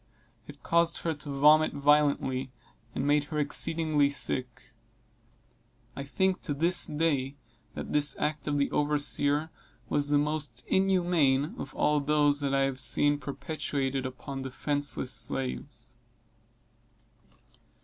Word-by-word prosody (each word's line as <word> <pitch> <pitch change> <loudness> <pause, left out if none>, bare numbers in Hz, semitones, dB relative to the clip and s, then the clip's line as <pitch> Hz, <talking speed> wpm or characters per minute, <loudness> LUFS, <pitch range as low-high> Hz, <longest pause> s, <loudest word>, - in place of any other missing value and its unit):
It - - -13
caused 170 0 +1
her 165 - -1
to 145 0 -9
vomit 150 +3 +4
violently, 140 -3 +1 0.4
and - - -2
made 145 0 +2
her 150 +1 -6
exceedingly 150 0 +1
sick. 125 -2 -4 1.2
I 140 - -5
think 190 +6 -1
to 145 - -4
this 170 +5 +3
day, 145 -3 -1 0.4
that - - -7
this 150 0 +2
act 150 0 -3
of 145 -1 0
the 140 - 0
overseer 145 +1 0 0.4
was 145 0 0
the 145 - +3
most 145 -4 -2
inhuman 175 -6 +1
of - - -7
all 150 0 +2
those 145 0 +2
that 140 -1 -1
I 135 0 +1
have 135 -1 -1
seen 145 +3 +5
perpetrated 140 -2 -3
upon 135 +1 -8
defenceless 140 0 -3
slaves. 130 -1 -4
145 Hz, 125 wpm, -28 LUFS, 140-150 Hz, 1.2 s, seen